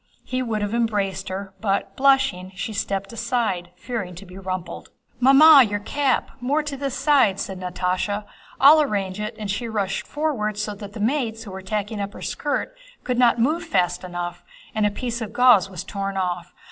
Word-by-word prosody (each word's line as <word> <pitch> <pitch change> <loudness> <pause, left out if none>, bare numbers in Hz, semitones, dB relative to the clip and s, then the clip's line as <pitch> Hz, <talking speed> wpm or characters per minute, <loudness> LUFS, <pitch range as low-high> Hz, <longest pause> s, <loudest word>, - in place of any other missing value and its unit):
He 255 0 -2
would 220 -4 -2
have 205 +1 -2
embraced 205 -5 -1
her 190 +1 -5
but, 200 -2 -1
blushing, 270 -9 +2
she 190 +4 -4
stepped 200 +1 -3
aside 230 -7 -1
fearing 195 -3 -5
to 190 +4 -10
be 180 0 -13
rumpled. 185 -2 -5 0.3
"Mamma, 275 +3 +8
your 205 0 -1
cap, 275 +5 0
more 285 +5 +1
to 295 -2 -4
this 275 -1 -3
side," 265 -10 +3
said 190 -2 -4
Natásha. 185 +3 -2 0.3
"I'll 300 +3 +8
arrange 200 -8 -2
it," 215 +2 -4
and 210 -2 -3
she 230 +3 -3
rushed 200 -3 -2
forward 260 -9 -1
so 210 0 -2
that 205 0 -9
the 215 - -8
maids 225 -1 -1
who 205 - -9
were 190 0 -7
tacking 210 +2 -3
up 200 +1 -4
her - - -10
skirt 295 +12 -2 0.3
could 250 -1 -1
not 240 -2 +5
move 305 +9 +1
fast 180 - 0
enough 175 -1 -5 0.3
and 215 -1 +2
a - - +2
piece 235 +3 -4
of 215 -1 -5
gauze 240 -7 +5
was 185 -4 -6
torn 195 -1 -4
off. 175 -2 -2
210 Hz, 190 wpm, -23 LUFS, 190-250 Hz, 0.3 s, Mamma